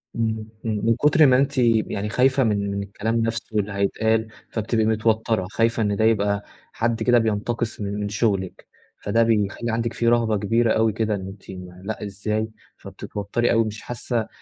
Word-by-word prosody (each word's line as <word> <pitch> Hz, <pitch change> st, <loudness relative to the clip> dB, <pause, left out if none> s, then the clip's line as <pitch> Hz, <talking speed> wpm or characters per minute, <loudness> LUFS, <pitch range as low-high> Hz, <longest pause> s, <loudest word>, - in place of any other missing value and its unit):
إمم 110 Hz, -2 st, -2 dB, 0.2 s
إمم، 110 Hz, -1 st, -1 dB
من 115 Hz, 0 st, +4 dB
كتر 150 Hz, +4 st, +5 dB
ما 130 Hz, -2 st, +5 dB
أنتِ 140 Hz, +1 st, 0 dB
يعني 110 Hz, -4 st, +1 dB
خايفة 130 Hz, +3 st, +3 dB
من 100 Hz, -3 st, 0 dB
من 100 Hz, 0 st, -2 dB
الكلام 105 Hz, +3 st, -3 dB
نَفسه 115 Hz, -1 st, -2 dB
اللي 105 Hz, 0 st, -2 dB
هيتقال، 110 Hz, +3 st, +1 dB, 0.2 s
فبتبقي 110 Hz, 0 st, 0 dB
متوترة، 110 Hz, -2 st, +1 dB
خايفة 115 Hz, +1 st, +1 dB
إن 105 Hz, -1 st, 0 dB
ده 110 Hz, -, +2 dB
يبقى 100 Hz, -2 st, +2 dB, 0.3 s
حد 115 Hz, 0 st, -1 dB
كده 120 Hz, +1 st, +4 dB
بينتقص 110 Hz, +1 st, -2 dB
من 100 Hz, 0 st, -3 dB
من 105 Hz, 0 st, -2 dB
شغلِك، 100 Hz, -3 st, -1 dB, 0.4 s
فده 115 Hz, +3 st, +3 dB
بيخلّي 110 Hz, +1 st, 0 dB
عندِك 115 Hz, +1 st, -1 dB
في 120 Hz, -, -1 dB
رهبة 115 Hz, -2 st, +3 dB
كبيرة 115 Hz, +3 st, +2 dB
أوي 110 Hz, -1 st, +2 dB
كده، 110 Hz, 0 st, 0 dB
إن 95 Hz, -1 st, -6 dB
أنتِ 95 Hz, +1 st, -12 dB, 0.3 s
لأ 110 Hz, +2 st, -5 dB
إزاي؟ 105 Hz, +2 st, -2 dB, 0.3 s
فبتتوتري 105 Hz, +4 st, -3 dB
أوي، 115 Hz, -1 st, +3 dB
مش 110 Hz, 0 st, -6 dB
حاسة 120 Hz, -1 st, -3 dB
110 Hz, 175 wpm, -23 LUFS, 105-115 Hz, 0.4 s, كتر